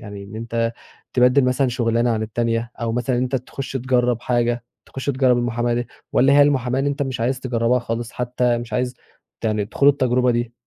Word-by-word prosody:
يعني 100 -2 -8
إن 100 +2 -10
أنت 115 0 -2 0.4
تبدِّل 125 +2 +4
مثلًا 125 +1 +2
شُغلانة 120 -1 +1
عن 110 -1 0
التانية 115 +1 -1
أو 115 -1 -1
مثلًا 125 +2 0
إن - - +1
أنت 130 +1 0
تخُش 130 +2 -6
تجرّب 125 -2 +1
حاجة 120 -1 0 0.2
تخُش 135 - -7
تجرّب 130 -3 +3
المُحاماة 120 0 0
دي؟ 120 +1 -2 0.3
والّا 135 +2 +4
هي 145 +1 +7
المُحاماة 130 -3 +1
اللي 135 - 0
إن - - 0
أنت 145 +1 -3
مش 130 -4 -3
عايز 130 +3 0
تجرّبها 125 -1 +1
خالص 115 0 -4
حتّى 125 -1 0
مش 120 0 -8
عايز 125 0 -1 0.5
يعني 105 -2 0
تخوض 140 +5 +4
التجربة 125 -2 +2
دي؟ 120 0 -1
120 Hz, 205 wpm, -21 LUFS, 115-130 Hz, 0.5 s, هي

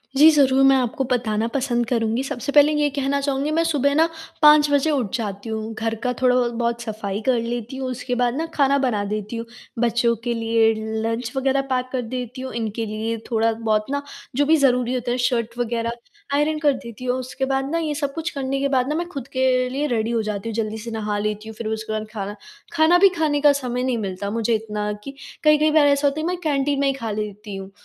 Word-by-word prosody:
जी, 305 +3 +8
ज़रूर 270 -3 +4
मैं 270 0 +6
आपको 260 +1 0
बताना 225 -2 0
पसंद 245 -3 0
करूँगी। 230 +1 0
सबसे 270 0 -4
पहले 295 +1 +6
ये 295 -1 +2
कहना 280 0 -1
चाहूँगी 280 +1 -1
मैं 330 +1 +2
सुबह 285 -3 +1
ना 325 +1 +4 0.3
5 300 -1 +7
बजे 285 +2 +3
उठ 245 -9 -1
जाती 205 -1 -4
हूँ। 220 0 -4
घर 225 +1 -2
का 250 - +1
थोड़ा 250 -1 +4
ब 245 -1 +3
बहुत 235 0 -1
सफ़ाई 210 -3 -4
कर 250 0 +2
लेती 240 +2 -4
हूँ, 260 -1 -3
उसके 250 0 -3
बाद 245 -1 +1
ना 320 +2 -1
खाना 280 -1 +3
बना 240 -7 0
देती 210 +2 -4
हूँ। 230 0 -4 0.3
बच्चों 235 0 +2
के 240 -1 0
लिए 225 -1 +2 0.3
लंच 230 +1 -2
वगैरह 270 +1 +2
पैक 255 0 0
कर 255 -2 -1
देती 250 +1 -5
हूँ, 260 - -6
इनके 225 0 -3
लिए 220 +2 -3
थोड़ा-बहुत 220 -1 +1
ना 285 0 -1 0.3
जो 290 +1 +3
भी 320 +2 +5
ज़रूरी 250 -3 +2
होता 245 -1 -2
है 250 - 0
शर्ट 235 -1 -1
वगैरह 235 -1 -1 0.4
आयरन 305 +1 +1
कर 295 -2 +4
देती 255 -1 -9
हूँ 250 - +1
और 260 - -2
उसके 255 +1 -3
बाद 270 0 -1
ना 335 - +1
ये 310 -2 -1
सब 285 -2 -2
कुछ 325 0 -3
करने 275 -1 -2
के 280 - +1
बाद 260 -1 +1
ना 300 - -1
मैं 345 +1 -1
खुद 275 -6 -6
के 260 - +1 0.3
लिए 280 +3 -2
रेडी 230 -2 0
हो 230 -1 +1
जाती 210 +1 -3
हूँ - - -4
जल्दी 220 -1 -2
से 230 +1 -7
नहा 210 -2 -2
लेती 210 +1 -3
हूँ। 220 - -9
फिर 230 - -4
उसके 220 0 -3
बाद 215 0 -3
खाना 205 0 -4 0.4
खाना 330 +2 +5
भी 395 0 +7
खाने 300 -2 +1
का 295 -1 +7
समय 250 -3 -2
नहीं 255 -2 0
मिलता 200 -1 -4
मुझे 230 +1 0
इतना, 210 -1 -3
कि 240 +7 -9 0.3
कई-कई 305 0 +5
बार 305 -2 +5
ऐसा 285 0 +3
होता 280 +2 -1
है - - -2
मैं 360 0 -1
कैंटीन 285 -2 +1
में 280 - +2
ही 275 - +2
खा 230 -5 -4
लेती 210 -1 -5
हूँ। 195 0 -8
245 Hz, 235 wpm, -22 LUFS, 225-280 Hz, 0.4 s, जी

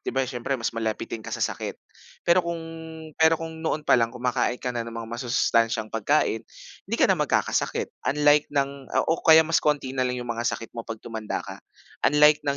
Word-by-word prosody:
'di - - -7
ba 135 0 0
siyempre 125 +1 -3
mas 115 - -2
malapitin 110 0 -3
ka - - -9
sa - - -1
sakit? - - -4 0.5
Pero 170 +2 +5
kung 170 -1 -3 0.6
pero 160 0 +6
kung 160 0 -7
noon 155 -2 -2
pa - - +3
lang 115 - +2
kumakain 125 0 -1
ka 125 0 -4
na 120 - -2
ng 115 - -8
mga 115 - -4
masusustansyang 115 -2 +1
pagkain, 115 +1 +1 0.5
hindi - - -1
ka - - +4
na - - +4
mag-kakasakit - - 0 0.2
unlike 150 +1 +4
ng 140 -1 -2 0.2
o 165 - 0
kaya 160 0 +7
mas 165 +1 +2
konti 145 -3 0
na 130 - -2
lang 125 - -2
'yong 120 -1 -3
mga 115 +1 -1
sakit 115 - -5
mo 120 - -5
'pag 115 0 -6
tumanda 110 -2 -4
ka, - - -9 0.5
unlike 150 +1 +5
ng 140 -2 -1
130 Hz, 205 wpm, -25 LUFS, 115-150 Hz, 0.6 s, kaya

